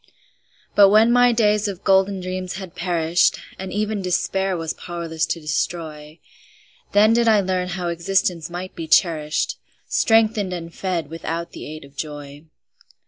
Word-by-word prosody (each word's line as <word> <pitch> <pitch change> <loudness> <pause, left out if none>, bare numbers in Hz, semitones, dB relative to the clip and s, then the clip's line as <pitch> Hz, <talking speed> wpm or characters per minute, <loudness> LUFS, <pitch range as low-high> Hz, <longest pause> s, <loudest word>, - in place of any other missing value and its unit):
But 200 -1 +7
when 220 +3 +5
my 245 0 +5
days 210 -2 +2
of 195 -1 -6
golden 195 0 +3
dreams 185 0 -4
had 190 -2 -8
perished, 170 -1 +1 0.2
And 190 0 -6
even 210 0 -1
Despair 190 +1 0
was 165 -1 -3
powerless 165 -2 -4
to 170 - -2
destroy, 155 0 -4 0.8
Then 215 +2 +5
did 235 0 +2
I 220 -2 +5
learn 185 -2 -1
how 180 -1 -3
existence 170 -1 0
might 180 +2 -6
be 165 -1 -6
cherished, 155 -2 +2 0.3
Strengthened 220 -4 +2
and 170 -1 -6
fed 170 -6 -3
without 165 +1 -4
the - - -9
aid 155 -1 -9
of 140 0 -19
joy. 145 +1 -7
180 Hz, 150 wpm, -22 LUFS, 165-195 Hz, 0.8 s, But